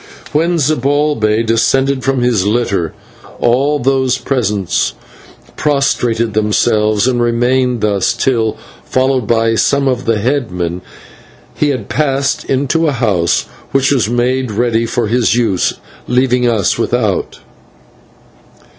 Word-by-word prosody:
When 170 +3 +1
Zibalbay 140 -6 +1
descended 130 +4 +1
from 135 -2 0
his 120 -6 +2
litter, 100 -6 0 0.5
all 135 +5 +2
those 130 -1 +1
present 105 - -1 0.6
prostrated 120 -6 0
themselves, 105 0 +1
and 125 -2 +1
remained 120 +1 +1
thus 100 -2 +1
till, 115 -4 0 0.3
followed 130 -3 0
by 115 -1 +2
some 140 +4 +1
of 130 -1 -1
the 115 -1 +1
headmen, 100 -8 -2 0.7
he 150 - 0
had 135 -3 -3
passed 140 -2 0
into 145 +5 0
a 145 - +1
house 100 -9 +1 0.3
which 135 0 +2
was 125 -6 +1
made 125 +1 0
ready 115 +1 0
for 120 +1 -1
his 115 +2 +1
use, 115 -7 +1 0.3
leaving 125 0 +2
us 110 -5 +1
without. - - -1
120 Hz, 120 wpm, -14 LUFS, 110-135 Hz, 0.7 s, his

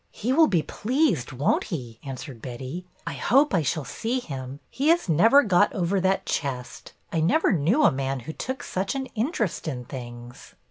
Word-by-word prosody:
''He 250 +5 -1
will 320 0 +6
be 170 - +2
pleased, 240 - 0
won't 135 +3 +1
he?" 125 - -6
answered 130 -3 -7
Betty. 130 +9 -6
" - - -34
I - - -3
hope 275 +1 +3
I 175 - +3
shall 150 0 -1
see 235 +3 -2
him. 135 - -7
He 275 +3 -1
has 335 -4 +4
never 225 - +6
got 205 -1 +3
over 190 0 0
that 190 +1 +1
chest. 130 -4 -4 0.2
I 165 - +1
never 200 - +3
knew 185 - +2
a - - +6
man 135 -1 -2
who 160 +7 -7
took 260 - -5
such 190 +6 -2
an 265 -1 -2
interest 225 - -1
in 125 -5 -4
things." 120 -1 -9
170 Hz, 190 wpm, -25 LUFS, -, 0.2 s, will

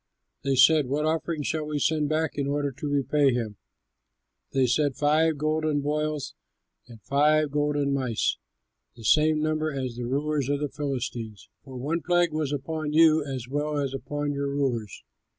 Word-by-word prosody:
They 135 0 +1
said, 145 +2 +5
"What 145 +4 -1
offering 160 -1 -1
shall 155 +1 -2
we 150 -1 -2
send 150 0 +1
back 155 0 0
in 140 -1 -2
order 145 0 -1
to 140 +3 -6
repay 140 -1 +2
him?" 110 -4 -3 0.9
They 135 -1 +2
said, 135 +2 +1
"Five 155 +1 +2
golden 155 0 0
boils 150 -1 -2 0.5
and 115 -2 -13
five 150 +1 +3
golden 145 -1 0
mice, 130 -5 0 0.6
the 115 - -13
same 155 +5 +3
number 155 0 0
as 130 -4 -4
the 120 -1 -4
rulers 145 +1 -1
of 145 0 +1
the 145 -1 -2
Philistines; 120 - -5
for 130 -2 -9
one 155 +7 -2
plague 175 0 +2
was 155 -2 -1
upon 150 +2 -3
you 160 -1 +5
as 130 -4 -5
well 145 +2 -2
as 140 -2 -1
upon 145 +2 -3
your 140 0 -2
rulers. 130 -7 -2
145 Hz, 170 wpm, -26 LUFS, 135-155 Hz, 0.9 s, said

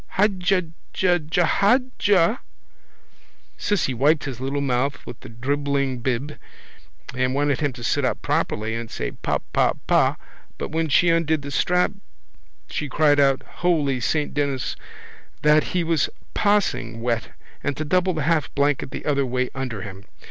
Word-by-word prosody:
—Haja 190 -2 +2 0.3
ja 180 -2 +3
ja 175 +1 +3
haja. 205 -2 +2 1.2
Cissy 195 -10 0
wiped 145 +6 +3
his 130 -4 -5
little 135 +2 -1
mouth 140 0 -1
with 115 - -9
the - - -11
dribbling 140 +2 -1
bib 130 +4 -2 0.7
and 130 0 0
wanted 145 -1 +1
him 145 -2 0
to 120 -1 -10
sit - - +1
up - - 0
properly 110 +1 -1
and 115 0 -4
say - - -4
pa - - -1 0.2
pa - - +3
pa - - +3 0.4
but - - -5
when 160 0 0
she 170 +5 +4
undid 160 -3 +2
the 140 - -6
strap 180 +6 +2 0.8
she 150 - -4
cried 145 +1 +3
out, 135 -1 +3
holy 150 -7 +1
saint 150 +4 -1
Denis, 140 -3 -1 0.7
that 150 +1 +5
he 180 -1 -1
was 165 -3 +1 0.2
possing 130 - +1
wet 115 -1 -2 0.3
and 140 -2 -1
to 155 - -3
double 185 +3 +2
the 155 - -1
half 160 0 +1
blanket 140 -1 +1
the - - -7
other 140 -2 +2
way 125 0 -1
under 125 -7 -4
him. 95 -1 -9
145 Hz, 155 wpm, -23 LUFS, 130-165 Hz, 1.2 s, that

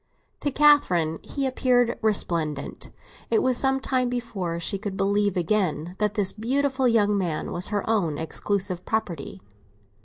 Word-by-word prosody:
To 290 - -1
Catherine 215 - +3
he 275 -1 -3
appeared 250 -2 +1
resplendent; 170 -9 -1 0.4
it 440 - +2
was 255 -1 +2
some 270 +1 +2
time 255 -2 0
before 200 -9 -3
she 195 +3 -1
could 200 -2 -5
believe 200 0 +1
again 175 -3 0
that 210 0 0
this 200 -4 +1
beautiful 265 +4 0
young 210 -3 +3
man 175 -6 -2
was 175 - -1
her 205 -2 -2
own 185 -10 +1
exclusive 185 +3 -2
property. 170 - -3
205 Hz, 145 wpm, -25 LUFS, 175-245 Hz, 0.4 s, Catherine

